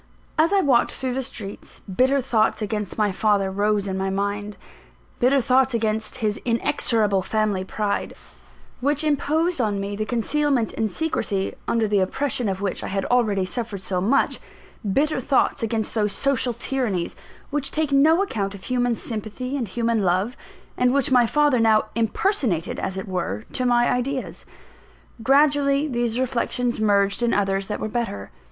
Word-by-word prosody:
As 315 Hz, +3 st, +3 dB
I 400 Hz, -1 st, +4 dB
walked 260 Hz, -7 st, +3 dB
through 260 Hz, -1 st, -2 dB
the 265 Hz, -, -1 dB
streets, 215 Hz, -6 st, -8 dB
bitter 260 Hz, +8 st, +1 dB
thoughts 225 Hz, -4 st, +1 dB
against 210 Hz, -2 st, -3 dB
my 210 Hz, -2 st, +2 dB
father 200 Hz, 0 st, +1 dB
rose 205 Hz, +1 st, 0 dB
in 190 Hz, 0 st, -2 dB
my 190 Hz, 0 st, -1 dB
mind 200 Hz, +1 st, -3 dB, 0.6 s
bitter 265 Hz, +3 st, +4 dB
thoughts 260 Hz, 0 st, +2 dB
against 220 Hz, +1 st, -1 dB
his 210 Hz, -1 st, -1 dB
inexorable 230 Hz, -4 st, +1 dB
family 210 Hz, -1 st, 0 dB
pride, 205 Hz, +2 st, -2 dB, 0.6 s
which 290 Hz, +4 st, +1 dB
imposed 310 Hz, +2 st, +1 dB
on 205 Hz, -3 st, 0 dB
me 200 Hz, +1 st, -3 dB
the 215 Hz, +1 st, -2 dB
concealment 255 Hz, +1 st, 0 dB
and 220 Hz, -1 st, -1 dB
secrecy, 200 Hz, -, -2 dB
under 225 Hz, -2 st, +1 dB
the 205 Hz, -1 st, +2 dB
oppression 240 Hz, +4 st, 0 dB
of 190 Hz, 0 st, -3 dB
which 195 Hz, -2 st, -2 dB
I -, -, -3 dB
had 195 Hz, 0 st, -2 dB
already 215 Hz, -6 st, +2 dB
suffered 205 Hz, +1 st, -4 dB
so 185 Hz, -1 st, -2 dB
much 240 Hz, +9 st, +2 dB, 0.5 s
bitter 290 Hz, +5 st, +1 dB
thoughts 260 Hz, +1 st, +1 dB
against 225 Hz, -1 st, -1 dB
those 210 Hz, -2 st, 0 dB
social 265 Hz, -3 st, +1 dB
tyrannies, 235 Hz, -7 st, -2 dB, 0.4 s
which 280 Hz, -1 st, +1 dB
take 310 Hz, -1 st, -1 dB
no 315 Hz, +7 st, +5 dB
account 200 Hz, -, -3 dB
of 195 Hz, -, -12 dB
human 245 Hz, 0 st, 0 dB
sympathy 225 Hz, +4 st, -5 dB
and 250 Hz, -5 st, -2 dB
human 230 Hz, +2 st, 0 dB
love, 190 Hz, +6 st, +1 dB, 0.4 s
and 250 Hz, +1 st, +2 dB
which 275 Hz, -2 st, +2 dB
my 245 Hz, -2 st, +5 dB
father 295 Hz, -1 st, +3 dB
now 220 Hz, -1 st, +3 dB
impersonated, 230 Hz, -, 0 dB
as 190 Hz, -, -3 dB
it 190 Hz, -, -5 dB
were, 110 Hz, -, -3 dB
to 255 Hz, -, 0 dB
my 240 Hz, 0 st, +3 dB
ideas. 260 Hz, +1 st, -2 dB, 0.7 s
Gradually 280 Hz, +2 st, +3 dB
these 240 Hz, -3 st, -1 dB
reflections 245 Hz, -1 st, -1 dB
merged 200 Hz, 0 st, +2 dB
in 240 Hz, -1 st, +2 dB
others 195 Hz, -1 st, 0 dB
that 210 Hz, -, -3 dB
were -, -, -2 dB
better. 215 Hz, -, -4 dB
230 Hz, 165 wpm, -23 LUFS, 200-265 Hz, 0.7 s, no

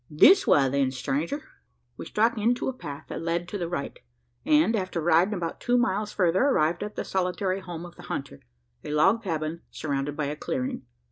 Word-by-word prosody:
"This 235 Hz, -, +6 dB
way, 140 Hz, -2 st, +5 dB
then, 135 Hz, 0 st, +1 dB
stranger!" 145 Hz, -, -2 dB, 0.5 s
We -, -, -8 dB
struck 225 Hz, +3 st, +2 dB
into 235 Hz, +3 st, +1 dB
a 265 Hz, -, -1 dB
path 145 Hz, -, -8 dB
that -, -, -5 dB
led 170 Hz, +1 st, -1 dB
to 205 Hz, -, -4 dB
the 170 Hz, -2 st, -3 dB
right; 140 Hz, -5 st, -4 dB, 0.4 s
and, 160 Hz, +9 st, +4 dB
after 185 Hz, -4 st, -2 dB
riding 175 Hz, +5 st, +3 dB
about 170 Hz, -3 st, -4 dB
two 245 Hz, 0 st, +2 dB
miles 210 Hz, -2 st, 0 dB
further, 180 Hz, -1 st, +2 dB
arrived 170 Hz, -, +2 dB
at 210 Hz, 0 st, -5 dB
the -, -, -3 dB
solitary 185 Hz, +1 st, -1 dB
home 175 Hz, -3 st, -7 dB
of 175 Hz, -, -13 dB
the 175 Hz, -, -11 dB
hunter 105 Hz, -, -5 dB, 0.4 s
a -, -, -7 dB
log 190 Hz, +10 st, +3 dB
cabin 165 Hz, -4 st, -3 dB
surrounded 145 Hz, -1 st, -3 dB
by 150 Hz, -, 0 dB
a 145 Hz, +1 st, -3 dB
clearing. 130 Hz, -, -3 dB
170 Hz, 195 wpm, -26 LUFS, 150-205 Hz, 0.5 s, This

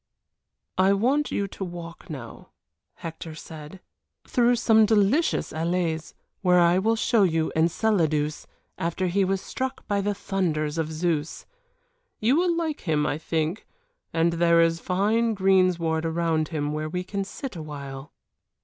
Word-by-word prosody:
"I 190 Hz, +1 st, +5 dB
want 265 Hz, +9 st, +1 dB
you 200 Hz, -, -1 dB
to 195 Hz, -, -6 dB
walk 175 Hz, 0 st, -8 dB
now," 130 Hz, -7 st, -9 dB, 0.5 s
Hector 165 Hz, -1 st, -7 dB
said, 155 Hz, +3 st, -10 dB, 0.5 s
"through 245 Hz, -1 st, +3 dB
some 220 Hz, -2 st, +4 dB
delicious 220 Hz, +9 st, +2 dB
allées 165 Hz, -1 st, -1 dB, 0.3 s
where 180 Hz, -2 st, +4 dB
I 175 Hz, +1 st, +4 dB
will 225 Hz, +4 st, +2 dB
show 225 Hz, 0 st, +2 dB
you 165 Hz, -4 st, +2 dB
Enceladus 160 Hz, -3 st, +1 dB, 0.3 s
after 170 Hz, +3 st, -1 dB
he 190 Hz, +2 st, +2 dB
was 190 Hz, 0 st, 0 dB
struck 260 Hz, 0 st, -5 dB
by 205 Hz, -1 st, +1 dB
the 205 Hz, +1 st, -1 dB
thunders 165 Hz, -6 st, -1 dB
of 160 Hz, -1 st, -2 dB
Zeus. 160 Hz, -1 st, -2 dB, 0.7 s
You 235 Hz, +5 st, +3 dB
will 345 Hz, +1 st, +2 dB
like 320 Hz, -3 st, -2 dB
him, 150 Hz, -2 st, +2 dB
I 150 Hz, -, -1 dB
think, 160 Hz, +4 st, -2 dB, 0.4 s
and 165 Hz, +1 st, +2 dB
there 170 Hz, 0 st, +4 dB
is 165 Hz, 0 st, +3 dB
fine 215 Hz, +6 st, +1 dB
greensward 185 Hz, -4 st, +2 dB
around 165 Hz, -1 st, 0 dB
him 150 Hz, -2 st, -2 dB
where 155 Hz, 0 st, -3 dB
we 180 Hz, +2 st, -3 dB
can 195 Hz, +1 st, -3 dB
sit 240 Hz, +4 st, -7 dB
awhile." 140 Hz, -3 st, -7 dB
175 Hz, 145 wpm, -25 LUFS, 160-200 Hz, 0.7 s, I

